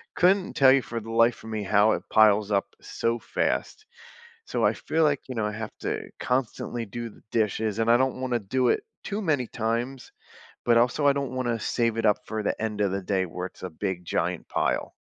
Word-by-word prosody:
couldn't 185 +1 +3
tell 135 -2 +7
you, 135 0 +5
for 115 -1 -5
the 115 +1 -8
life 115 +1 +3
of 110 - -8
me, 110 -1 -2
how 105 +2 +4
it - - -3
piles 105 -1 +4
up 100 -1 +2 0.2
so 115 +1 -2
fast, 430 - -2 0.6
so, - - 0
I - - +4
feel 160 0 0
like, 145 -3 +2
you 130 - -6
know, 110 -2 0
I 105 - -2
have 110 0 -5
to - - -3
constantly 125 -2 -2
do 115 +3 -6
the - - -18
dishes, 110 -1 0
and 115 0 +2
I - - +7
don't 130 0 0
wanna 125 -2 0
do 125 +5 0
it - - +1 0.2
too 210 +1 -3
many 145 - 0
times, 120 +4 -3 0.5
but, 120 -1 +5
also, 120 +5 +2
I - - +7
don't 140 -2 -2
wanna 120 -3 -1
save 115 +1 0
it 115 - 0
up 105 -1 +4
for 110 0 -3
the - - 0
end 110 -2 -2
of 100 -2 +2
the 100 +1 -2
day 95 0 0
where 90 +1 -5
it's - - -18
a 95 - -3
big, 90 +1 -4
giant - - -2
pile. - - -1
115 Hz, 225 wpm, -26 LUFS, 105-130 Hz, 0.6 s, tell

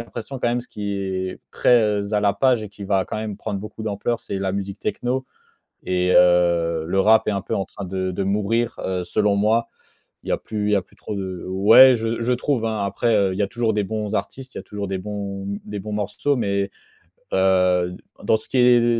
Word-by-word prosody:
l'impression 120 +3 -7
quand - - 0
même, 120 +1 0
ce 125 - -15
qui 105 -1 -4
est 95 -1 -3
très 105 -4 +2
à 105 - +3
la 100 -1 +3
page 120 +2 +2
et 105 - -7
qui 100 0 -12
va 95 -1 +1
quand - - -5
même 110 -2 -4
prendre 105 -2 -4
beaucoup 105 +1 -8
d'ampleur, 110 +3 -2
c'est 100 - -5
la 95 -1 0
musique 100 0 -4
techno. 125 +4 -2 0.6
Et 90 0 +1
heu, 85 -2 +4
le 95 +2 +1
rap 110 +2 +4
est 105 - +2
un 100 - -1
peu - - -5
en 95 - -1
train 100 - -9
de 95 0 -2
de 95 +2 -2
mourir, 105 +4 0
heu, 90 -1 -2
selon 100 +3 +1
moi. 110 +3 +2 0.6
Il - - -7
y - - +1
a - - +1
plus 105 -1 -3
il - - +1
y - - +5
a 100 - +2
plus - - -23
trop - - -6
de 95 -2 -5
ouais, 110 +7 +7
je 115 +1 -2
je 125 - +1
trouve, 125 -2 -1
hein. 110 -2 -1
Après, 115 +4 0
heu, 100 -2 +2
il - - -5
y 105 - +3
a - - 0
toujours 115 -1 -1
des 105 -1 0
bons 105 0 -3
artistes, 130 -1 -5
il - - -5
y - - -6
a - - -20
toujours 100 -1 -5
des 95 0 -2
bons 100 -1 -5 0.2
des 105 0 -5
bons 105 +2 -7
morceaux, 105 +7 -1
mais, 100 -3 -1 0.6
heu, 90 -1 +3 0.3
dans 110 - +3
ce 110 - -16
qui 130 - -1
est 125 0 +6
les 120 0 +2
105 Hz, 245 wpm, -22 LUFS, 95-110 Hz, 0.6 s, ouais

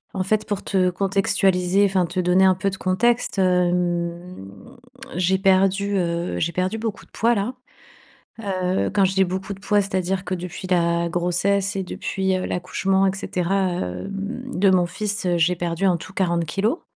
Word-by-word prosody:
en 185 - 0
fait 215 +2 0
pour 205 -2 -3
te 185 -2 +2
contextualiser, 195 0 +2
enfin 185 -3 +1
te 180 +2 -3
donner 180 +2 +4
un 185 -1 +5
peu 195 +1 -1
de 190 - -6
contexte, 225 +5 +1
hem, 175 - 0 0.7
j'ai 185 +1 +2
perdu 195 +1 +2
heu, 170 0 -1
j'ai 170 +1 -1
perdu 185 +5 -1
beaucoup 220 -2 -4
de - - -32
poids 235 +1 +2
là. 210 +5 -1 0.9
Heu, 185 -3 -1
quand 200 0 +2
je 190 - +2
dis: 190 0 +3
«Beaucoup 190 +2 -4
de 195 - -9
poids», 205 0 +2
c'est 195 -1 -8
à 185 - +3
dire 185 +1 -2
que 185 - -2
depuis 180 +1 -6
la 170 -1 +1
grossesse 190 +3 0
et 190 - -1
depuis, 190 +1 -2
heu, 185 - -2
l'accouchement 190 +2 0
et 190 - +1
cetera, 185 -2 -2 0.2
hem, 195 - -4 0.2
de 195 +1 +5
mon 180 -2 +3
fils, 205 +1 -3
heu, 175 -1 +2
j'ai 170 +2 +3
perdu 170 +2 -1
en 180 -3 +3
tout 185 - -11
40 170 -3 0
kilogrammes. 210 - -1
185 Hz, 190 wpm, -22 LUFS, 180-195 Hz, 0.9 s, un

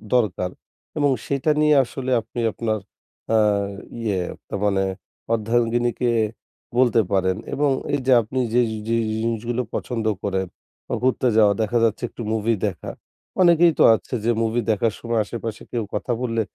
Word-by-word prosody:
দরকার। 95 -6 +1 0.5
এবং 145 -2 +3
সেইটা 140 +2 +1
নিয়ে 150 0 +5
আসলে 130 +1 -5
আপনি 115 +2 -8
আপনার 110 -1 -2 0.6
আ - - +5 0.6
ইয়ে 105 -5 0 0.3
ন - - -11
মানে 100 -2 +2 0.5
অর্ধাঙ্গিনীকে 120 +2 +1 0.7
বলতে 120 -3 +4
পারেন 95 0 +1 0.2
এবং 145 -1 +2 0.2
এই 145 - +2
যে 130 - +4
আপনি 120 +4 -4
যে 125 - +5 0.3
যে 115 - +1 0.3
জিনিসগুলো 115 +2 -1
পছন্দ 115 -3 -3 0.2
করেন 95 -2 -1 0.4
বা - - -4
ঘুরতে 130 0 +2
যাওয়া 105 -2 +6
দেখা 110 +2 +1
যাচ্ছে 115 +1 +1
একটু - - -10
মুভি 110 +1 +1
দেখা। 95 -6 -4 0.5
অনেকেই 170 -1 +6
তো - - +7
আছে 110 - -4
যে 120 - +3
মুভি 115 +1 +1
দেখার 110 +1 +1
সময় 115 -1 -1
আশেপাশে 115 -1 -6
কেউ 120 -2 -1
কথা 105 +4 -2
বললে 115 -2 0
115 Hz, 150 wpm, -22 LUFS, 110-125 Hz, 0.7 s, তো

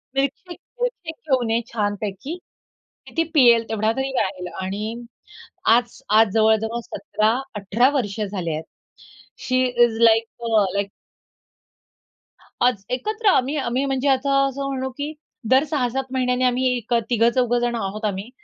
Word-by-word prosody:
"Milkshake, 280 +6 -2 0.2
milkshake 385 -10 -3 0.2
घेऊन 245 -4 +2
ये 230 +1 +2
छानपैकी 210 - -3 0.7
की - - -13
ती - - +5
पियेल 235 -4 +6
तेवढा 220 0 +1
तरी 265 0 -1
राहील." 185 -3 -2 0.2
आणि 195 +3 -3 0.9
आज 240 +1 -2 0.2
आज 225 -4 +4
जवळ-जवळ 220 +1 +2
17-18 220 +2 0
वर्ष 205 -3 -3
झाले 190 -5 -3
आहेत, 155 +1 -4 0.8
शी 255 0 +1
इस 240 -2 +2
लाइक 225 0 +5 0.2
अ, 220 -3 +3
लाइक 200 0 -1 1.7
आज, 245 -6 +2
एकत्र 430 - -2
आम्ही 280 -6 +3
आम्ही 260 0 -1
म्हणजे 270 0 -1
आता 275 +1 +2
असं 275 +1 -4
म्हणू 265 -1 -3
की 290 +2 -3 0.4
दर 260 +2 +5
6-7 265 -2 0
महिन्यांनी 255 -1 +1
आम्ही 250 +1 +1
एक 240 0 -4 0.2
तिघं 235 -1 +4
चौघं 245 -1 +2
जणं 240 0 -1
आहोत 215 +3 -4
आम्ही 200 +2 -3
240 Hz, 140 wpm, -22 LUFS, 215-265 Hz, 1.7 s, पियेल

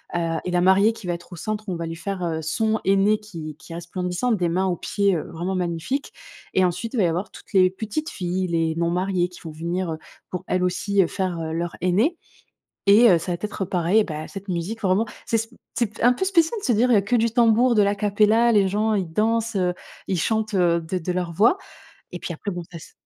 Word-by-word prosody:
heu, 165 -1 0
et 180 - -2
la 175 0 +2
mariée 195 +4 +5
qui 220 -4 -10
va 175 - 0
être 175 +1 -9
au - - -6
centre. 215 +5 -4
On 180 - -1
va 170 0 -4
lui 165 - -5
faire, 185 +3 -4
heu, 160 -2 -2
son 220 +8 0
henné 195 +2 +4
qui 165 -8 -8
qui - - -15
est - - -6
resplendissant, 180 +6 -2
des 180 -6 +1
mains 185 +3 +1
aux 180 - 0
pieds, 200 +2 0
heu, 155 - -2
vraiment 175 +3 -3
magnifique. 180 - -2 0.4
Et 190 - +3
ensuite, 180 +7 -1
il - - -2
va 210 - +3
y - - +4
avoir 175 +5 -2
toutes - - -15
les 185 -1 +5
petites 220 - -4
filles, 185 0 -2
les 165 -1 0
non 170 0 0
mariées 180 0 0
qui 180 - -13
vont 165 - -6
venir, 170 +3 -3
heu, - - -5 0.3
pour 180 - -5
elles 185 0 +1
aussi, 195 +2 +1
heu, 180 - +2
faire 185 -3 -2
leur 170 +1 -3
henné 205 - +2 0.7
et 220 +4 +7
heu, 175 - +6
ça 180 - -4
va 175 - -1
t 175 - -4
être 205 - -4
pareil. 185 +3 +2
Bah 155 -4 -5
cette 195 0 -9
musique 180 +6 -3
vraiment, 195 +2 +2 0.2
c'est 230 - +1
sp 225 +2 -6 0.2
c'est 235 - +2
p - - -6
un 245 - +7
peu 250 +10 -1
spécial 370 +2 +2
de - - -7
se 245 - +3
dire, 245 +4 +3
heu, 220 - +6
que 200 +5 0
du 230 -1 +2
tambour, 235 +1 +4
de 210 - +5
l'a 200 +1 +1
cappella. 210 +3 +3
Les 205 -3 +4
gens 210 +3 +1
ils 190 -4 -1
dansent, 225 +4 0
heu, 180 -2 +1 0.3
ils 185 -3 0
chantent, 220 +3 0
heu, 170 -2 +3
de 165 +3 -3
de 180 +1 -3
leur 180 -1 -2
voix. 220 - +4 0.6
Et 175 - -6
puis - - -4
après 200 +5 -5
bon 175 0 -5
ça 175 - -9
s - - -14
190 Hz, 250 wpm, -23 LUFS, 175-215 Hz, 0.7 s, et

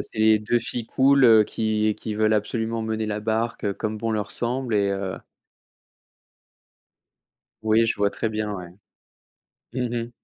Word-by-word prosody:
c'est 110 - -10
les 110 0 +5
2 105 +3 +1
filles 120 0 -4
cool, 135 +1 +4
heu, 110 -2 +7
qui 110 0 0
qui 110 0 -5
veulent 110 0 +2
absolument 110 +2 -1
mener 110 0 -2
la 105 0 -3
barque, 110 +2 -2
heu, 100 -1 0
comme 110 -1 -3
bon 115 +1 -2
leur 105 -1 -2
semble 120 -1 -2
et 100 -1 +2
heu. 95 -1 -3 2.5
Oui, 110 +1 +3
je 115 - 0
vois 100 0 +2
très 115 - -3
bien, 105 -1 -3
ouais. 90 -3 -7 1.0
Mmh 120 -1 -2
mh. - - -13
110 Hz, 165 wpm, -24 LUFS, 105-115 Hz, 2.5 s, heu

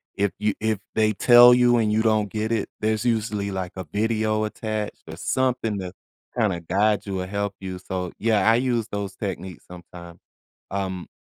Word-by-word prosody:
if 100 -1 +1
you 105 -1 0
if 110 -2 0 0.2
they 110 -1 +3
tell 120 +4 +8
you 125 -1 +4
and 110 -2 +1
you 110 +1 +2
don't 110 -2 +2
get 110 +1 -2
it, 110 -3 -1
there's 110 +2 0
usually, 105 -3 0
like, 95 -2 -4
a 95 - -5
video 110 +1 0
attached 110 -1 -4
or - - -7
something 125 -5 -1
to 90 -1 -6 0.4
kinda 100 -7 +1
guide 105 +5 +1
you 95 -2 -3
or 90 - -5
help 100 +1 -2
you, 95 -1 -6
so, 90 -1 -4
yeah, 110 -1 +2
I 115 - +5
use 120 -2 0
those 100 -2 -5
techniques 95 -4 -6
sometimes. 85 -1 -12 0.5
Um 95 -2 -3
105 Hz, 180 wpm, -24 LUFS, 95-110 Hz, 0.5 s, tell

